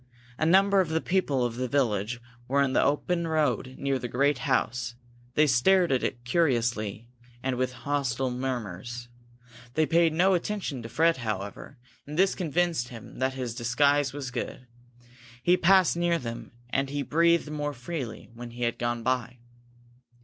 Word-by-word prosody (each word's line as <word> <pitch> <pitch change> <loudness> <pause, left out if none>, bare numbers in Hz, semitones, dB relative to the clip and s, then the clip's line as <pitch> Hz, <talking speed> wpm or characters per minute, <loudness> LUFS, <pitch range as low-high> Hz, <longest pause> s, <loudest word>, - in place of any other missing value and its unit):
A 155 - +2
number 195 +2 +5
of 175 - -2
the 160 0 +1
people 150 -9 +1
of 120 -1 -3
the 130 0 -1
village 120 -3 0 0.3
were 140 +2 +1
in 130 -1 0
the - - +4 0.2
road 155 -7 0
near 135 -1 -1
the 120 - -4
great 140 +3 +1
house; 120 -1 -1 0.4
they 155 - +5
stared 170 +7 +4
at 130 - +2
it 120 0 -3
curiously, 120 - 0 0.4
and 130 -1 0
with 125 0 -1
hostile 135 -3 0
murmurs. 120 -2 -4 0.7
They 155 - +3
paid 165 +1 +3
no 180 +5 +3
attention 180 - -2
to 115 - -8
Fred, 165 +8 +3
however, 110 +3 -5 0.3
and 150 +2 -6
this 190 +1 +4
convinced 170 -6 0
him 120 -2 -11
that 130 0 0
his 125 -3 -3
disguise 140 +4 +2
was 135 -2 -5
good. 125 +1 -5 0.8
He 175 - +5
passed 185 0 +4
near 170 0 +2
them, 115 -5 -7 0.2
and 135 0 0
he 145 0 -2
breathed 170 0 +2
more 145 -1 -2
freely 125 -3 -6
when 120 +1 -8
he 120 +1 -6
had 120 0 -1
gone 120 -1 -1
by. 125 0 -1
135 Hz, 165 wpm, -27 LUFS, 120-160 Hz, 0.8 s, number